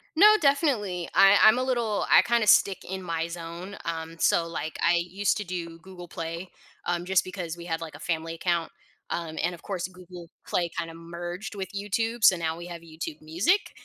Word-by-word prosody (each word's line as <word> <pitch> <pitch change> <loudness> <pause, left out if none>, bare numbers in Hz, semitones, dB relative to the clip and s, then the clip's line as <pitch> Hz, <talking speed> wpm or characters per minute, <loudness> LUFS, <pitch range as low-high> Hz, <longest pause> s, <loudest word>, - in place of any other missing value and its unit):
No, 425 +6 +8
definitely. 255 - +1
I 195 +1 +7
I'm 215 +2 +8
a - - 0
little 240 -5 0
I - - +8
kinda 235 -2 +1
stick 195 -1 +5
in 190 +1 -5
my 165 -2 -2
zone. 170 +3 -7
Um, 165 0 -4
so, 165 0 +3
like, 160 -1 -5
I 170 +1 +4
used 180 +4 0
to 210 - -3
do 170 -3 -6
Google 180 0 -11
Play, 165 +2 -6 0.4
um, 175 0 -1
just 190 0 +3
because 180 -3 -5
we 170 0 -10
had, 165 -1 -3
like, 160 -3 -7
a - - -11
family 165 0 -2
account. 170 -1 -1 0.4
Um, 165 -2 -4
and 175 +1 -1
of 170 - -17
course, 185 -3 -3
Google 180 -2 -12 0.2
Play 175 -1 0
kinda 165 -1 -3
merged 175 +4 -7
with 190 -2 -5
YouTube, 220 +3 -2
so 190 - +8
now 160 -1 -2
we 175 +1 -8
have 170 -1 -8
YouTube 160 -1 -7
Music, 180 - +1
175 Hz, 200 wpm, -27 LUFS, 165-195 Hz, 0.4 s, No